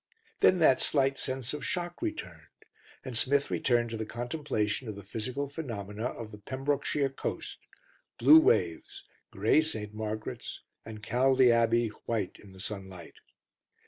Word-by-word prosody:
Then 185 - +5
that 145 -6 +5
slight 135 -1 +1
sense 130 -1 -2
of 150 - -5
shock 175 - -3
returned, 320 -2 -5 0.6
and 130 -3 -5
Smith 140 +4 +2
returned 120 -2 +1
to 115 - -3
the 110 - -2
contemplation 120 -2 -2
of 105 - -5
the 100 - -9
physical 125 +8 -4
phenomena 115 -7 -5
of 115 -3 -7
the 105 - -10
Pembrokeshire 135 +4 -1
coast 135 - -5 0.6
blue 315 - +9
waves, 400 +1 +1 0.3
grey 155 - +3
St. 110 -10 -5
Margaret's, 110 0 -5 0.2
and 110 -1 -9
Caldy 130 +2 +4
Abbey 115 0 +3 0.2
white 110 -5 -2
in 100 - -14
the 95 - -14
sunlight. 95 -4 -6
120 Hz, 145 wpm, -30 LUFS, 110-140 Hz, 0.6 s, blue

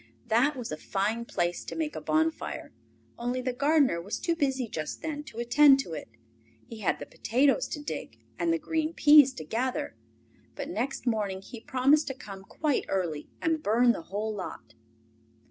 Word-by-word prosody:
That 250 +7 +3
was 245 -7 -5
a 155 - -3
fine 210 +7 -1
place 175 -5 -1
to - - -7
make 315 -2 -2
a - - -4
bonfire, 320 +1 -1 0.5
only 245 +2 -1
the 255 0 -2
gardener 280 - +3
was 200 +5 -4
too 335 - 0
busy 270 -5 0
just 155 -7 -5
then 295 -2 -3
to 225 - -12
attend 270 +4 +6
to 170 - -8
it. 150 - -6 0.6
He 230 - -10
had 205 - +1
the - - -7
potatoes 275 - +1
to 300 - -5
dig 295 - -6 0.2
and 335 - +2
the 330 - +2
green 320 0 -2
peas 295 -2 +8
to 160 - -7
gather, 240 +10 -2 0.6
but 280 +1 -5
next 270 -6 -3
morning 205 -5 -1
he 230 +2 -10
promised 275 +5 +3
to 270 - -3
come 200 -6 -9
quite 295 +7 -1
early 170 -6 -2
and 320 -1 +1
burn 235 +2 +4
the 215 - -3
whole 215 +3 -2
lot. 115 - -7
250 Hz, 180 wpm, -28 LUFS, 210-295 Hz, 0.6 s, peas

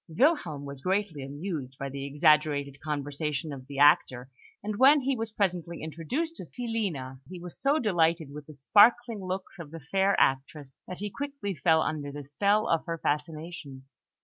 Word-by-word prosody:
Wilhelm 170 - +1
was 140 -1 -7
greatly 185 -3 -1
amused 140 -1 -5
by 140 - -4
the 140 +1 -5
exaggerated 145 -2 +2
conversation 150 0 -3
of 130 -1 -10
the 140 -1 -8
actor; 135 -3 +4 0.3
and 210 0 -3
when 280 +4 +6
he 270 +1 0
was 225 -1 -3
presently 180 -6 -2
introduced 170 - -3
to - - -8
Filina, 195 - -3
he 180 -1 -8
was 175 0 -9
so 280 +2 +3
delighted 170 - +1
with 150 -1 -9
the 155 - -12
sparkling 220 - +4
looks 185 0 -5
of 160 -3 -8
the 165 +2 -8
fair 195 +6 +1
actress 135 +1 0
that 180 - -6
he 205 0 -5
quickly 280 -7 -4
fell 160 +1 +3
under 145 -2 -3
the 145 0 -7
spell 200 +10 +1
of 165 - +1
her 165 0 -2
fascinations. 150 -3 -4
160 Hz, 175 wpm, -28 LUFS, 140-200 Hz, 0.3 s, when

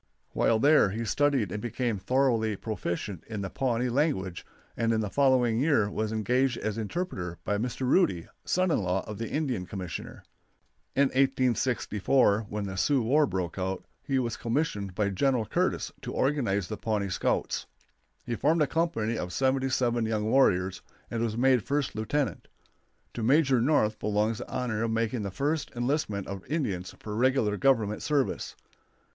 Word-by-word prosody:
While 115 - +2
there 145 -3 +5
he 115 +4 -3
studied 135 -5 +1
and 105 - -4
became 120 -2 -2
thoroughly 115 0 +1
proficient 95 -3 -4
in 105 -3 -4
the 95 - -4
Pawnee 125 -2 0
language, 120 - 0 0.3
and 115 0 +1
in 110 - +2
the 105 -2 -3
following 130 -5 +3
year 130 -8 +2
was 110 +1 -2
engaged 125 +3 +1
as 110 -1 -2
interpreter 110 - -4
by 105 0 -1
Mr. 125 +3 -3
Rudy, 125 - +2 0.2
son 185 0 +1
in - - +2
law 90 0 -1
of 105 0 -7
the 115 - -3
Indian 130 - -2
Commissioner. 90 -5 -6 0.7
In 140 0 +4
1864, 125 -4 +2
when 105 0 -3
the 95 -1 -5
Sioux 130 +7 +2
war 145 +6 +3
broke 90 -3 -3
out, 95 +1 -3 0.2
he 135 - -1
was 120 -3 -1
commissioned 115 - -2
by 105 0 +1
General 125 +3 +1
Curtis - - -1
to - - -5
organize 115 -10 0
the 110 - -5
Pawnee 105 -3 -1
Scouts. - - -1 0.6
He 120 - -3
formed 155 +7 +2
a - - +3
company 135 -9 -1
of 90 - -4
seventy 135 +4 +1
seven 120 -3 +1
young 110 -1 -1
warriors, 95 -6 +2 0.3
and 115 - -2
was 115 -1 -1
made 130 -1 +4
first 140 +5 -1
lieutenant. 110 - -2 0.7
To 120 - -5
Major 130 +1 +4
North 115 -6 +2
belongs 105 +2 0
the - - -7
honor 120 -4 -2
of 115 - 0
making 115 +1 0
the 100 - -3
first 145 +9 -1
enlistment 120 -5 -1
of 95 -1 -6
Indians 100 - -2
for 105 -1 -6
regular 120 -3 +2
Government 110 -4 +2
service. 145 -3 -1
115 Hz, 165 wpm, -28 LUFS, 105-135 Hz, 0.7 s, there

